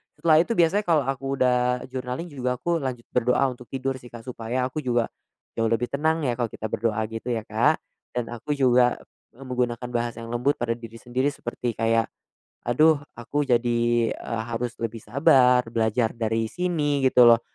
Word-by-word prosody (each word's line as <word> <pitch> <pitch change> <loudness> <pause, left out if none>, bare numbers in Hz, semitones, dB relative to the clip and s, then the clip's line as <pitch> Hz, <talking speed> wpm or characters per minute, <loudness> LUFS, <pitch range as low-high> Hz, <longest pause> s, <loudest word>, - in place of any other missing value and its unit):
Setelah 160 -2 +4
itu 175 - +1
biasanya 180 +4 +3
kalau 160 -4 +3
aku 135 +1 -2
udah 125 -1 +2
journaling 130 +6 -4
juga 125 -2 -2
aku 170 +7 -1
lanjut 130 -4 -4
berdoa 125 +2 +2
untuk 125 -1 -12
tidur 135 0 -3
sih 120 - -13
Kak, 120 -1 -11
supaya 125 0 -3
aku 130 +4 -2
juga 120 -5 0 0.5
jauh 115 - +2
lebih 115 +2 0
tenang 160 +3 +1
ya 130 - +1
kalau 120 - +1
kita 110 0 -6
berdoa 110 0 0
gitu 115 +2 -6
ya, 115 -3 -1
Kak. - - +1 0.3
Dan 120 -1 -2
aku 120 +5 -3
juga, 125 -2 +4 0.4
eee, 135 - -11
menggunakan 125 -1 -2
bahasa 120 -1 -2
yang 115 - -7
lembut 125 +4 +1
pada 120 -1 -2
diri 115 -1 -6
sendiri 125 +4 -1
seperti 120 -4 -3
kayak, 115 0 +2 0.6
"Aduh, 150 +5 +4 0.2
aku 145 +5 -2
jadi, 120 -1 +2
eee, 115 -1 -4
harus 120 +1 -3
lebih 115 0 -3
sabar, 125 -1 +4
belajar 115 0 +1
dari 115 -1 -1
sini 155 -6 0
gitu 125 -1 +6
loh, 115 -1 +7
125 Hz, 180 wpm, -25 LUFS, 115-135 Hz, 0.6 s, loh